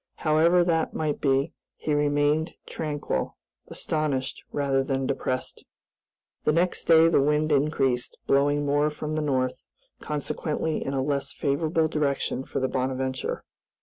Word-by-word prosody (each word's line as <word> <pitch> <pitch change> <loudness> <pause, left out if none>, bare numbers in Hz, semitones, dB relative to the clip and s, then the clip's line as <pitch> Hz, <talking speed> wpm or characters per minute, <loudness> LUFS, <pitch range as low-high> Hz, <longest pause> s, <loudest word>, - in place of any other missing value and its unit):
However 165 +3 +4
that 165 -2 0
might 155 -2 -1
be, 135 +2 +1 0.2
he 150 - -2
remained 145 +2 +1
tranquil, 150 -2 -3 0.3
astonished 150 -4 -2
rather 135 -2 +1
than 135 0 -1
depressed. 130 -1 -3 0.8
The - - +3
next 175 +3 +1
day 165 0 +7
the 165 - +4
wind 150 +2 +2
increased, 135 -4 +1
blowing 145 +1 +2
more 145 +1 +2
from 150 0 -5
the 155 - 0
north, 130 -3 0 0.4
consequently 150 +1 -2
in 135 - -3
a 135 - +1
less 140 0 -1
favorable 155 +3 +1
direction 140 -3 -1
for - - -3
the 130 - +1
"Bonadventure." 130 0 -2
145 Hz, 135 wpm, -26 LUFS, 135-155 Hz, 0.8 s, day